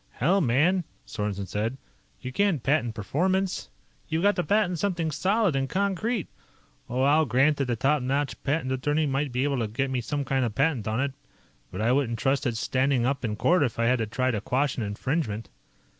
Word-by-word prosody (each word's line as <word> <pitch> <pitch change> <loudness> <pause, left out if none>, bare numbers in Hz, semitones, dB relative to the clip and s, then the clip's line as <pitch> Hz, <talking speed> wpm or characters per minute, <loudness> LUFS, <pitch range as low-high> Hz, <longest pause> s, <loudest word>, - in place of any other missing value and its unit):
"Hell, 180 +10 +2
man," 160 +8 +3 0.2
Sorensen 105 -2 -3
said, 110 +7 -2 0.4
"you 130 - -6
can't 195 - +1
patent 135 -5 +1
performance! 185 - -1 0.4
You've 160 +2 -1
got 205 0 +4
to 180 - +1
patent 200 -4 +1
something 170 -5 -1
solid 195 +1 +1
and 135 0 0
concrete! 200 +2 -1 0.6
Oh, 125 +2 0
I'll 150 +3 +4
grant 135 +5 +3
that 140 -3 -1
a 120 - +1
top 140 +5 +2
notch 135 +2 -1
patent 145 -2 0
attorney 145 +4 +1
might 140 0 -1
be 125 +2 0
able 140 -2 0
to 115 - 0
get 130 +5 -2
me 125 -2 0
some 145 +4 -3
kind 135 -1 +1
of 115 -3 -2
patent 135 -7 +1
on 110 +2 0
it, 140 -1 -1 0.6
but 95 - -5
I 115 +2 +2
wouldn't 125 -4 +1
trust 135 +2 +1
its 115 -2 -2
standing 130 -1 +1
up 135 0 -1
in 110 -3 -1
court 145 +11 +3
if 125 -5 0
I 115 - +1
had 125 +1 +3
to 110 - -1
try 130 +4 0
to 105 -4 -2
quash 135 +5 0
an - - -3
infringement. 110 0 -2
135 Hz, 205 wpm, -26 LUFS, 120-160 Hz, 0.6 s, got